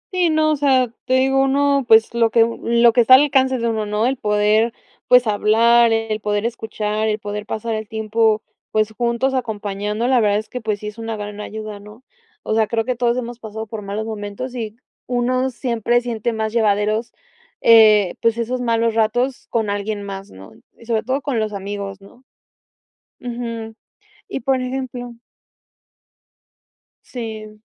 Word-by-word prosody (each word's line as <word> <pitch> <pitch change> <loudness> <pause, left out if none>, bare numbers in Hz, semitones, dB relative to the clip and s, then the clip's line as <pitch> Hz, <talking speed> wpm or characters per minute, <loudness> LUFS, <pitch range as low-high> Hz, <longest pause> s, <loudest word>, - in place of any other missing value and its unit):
Sí, 355 -2 +3
no, 310 0 +2
o 305 - +2
sea, 260 -4 +2
te 255 - +1
digo, 270 +1 +3
uno, 280 0 +2
pues, 220 +1 +5
lo 230 -1 +3
que 230 0 +4 0.2
lo 235 0 +4
que 245 - +5
está 255 +3 +8
alcance 265 -2 +3
de 235 0 -1
uno, 220 -2 -1
¿no? 210 +2 0
El 265 +1 0
poder, 210 +2 +2 0.4
pues, 250 0 +6
hablar, 230 +2 +4
el 225 -1 -1
poder 210 +1 -1
escuchar, 220 -2 -2
el 215 0 0
poder 210 0 -6
pasar 225 +1 -3
el 215 -1 -4
tiempo, 220 -1 +1 0.3
pues, 215 0 0
juntos, 240 +3 0
acompañando, 210 -1 -2
la 255 -2 +4
verdad 205 -2 +2
es 215 - -5
que, 250 - -6
pues, 215 -2 -2
sí - - -8
es 210 +2 -7
una 225 0 -4
gran 205 0 -6
ayuda, 215 -1 -7
¿no? 210 +4 -14 0.4
O - - -2
sea, 220 -1 +2
creo 225 -1 -1
que 255 -1 -1
todos 240 0 +1
hemos 240 -1 -5
pasado 220 0 -7
por 220 -1 -7
malos 205 +2 -4
momentos 215 +3 -6
y 220 -4 -5 0.3
uno 255 +1 0
siempre 240 -1 0
siente 235 -1 -3
más 220 -1 -3
llevaderos, 215 0 +1 0.5
eh, 215 -4 +6
pues 230 0 +2
esos 250 +2 -2
malos 230 -1 +1
ratos 240 +4 0
con 220 -3 -1
alguien 205 0 -3
más, 195 -1 -7
¿no? 95 0 -13 0.3
Y 230 - -16
sobre 225 -2 0
todo 260 +4 -2
con 270 -5 -1
los 215 -1 -2
amigos, 200 0 -6
¿no? 240 +6 -18 1.0
Ujú. 230 -2 -6 0.5
Y - - -4
por 260 +1 0
ejemplo 255 -1 -5 1.9
Sí. 215 -3 -7
225 Hz, 175 wpm, -20 LUFS, 215-245 Hz, 1.9 s, está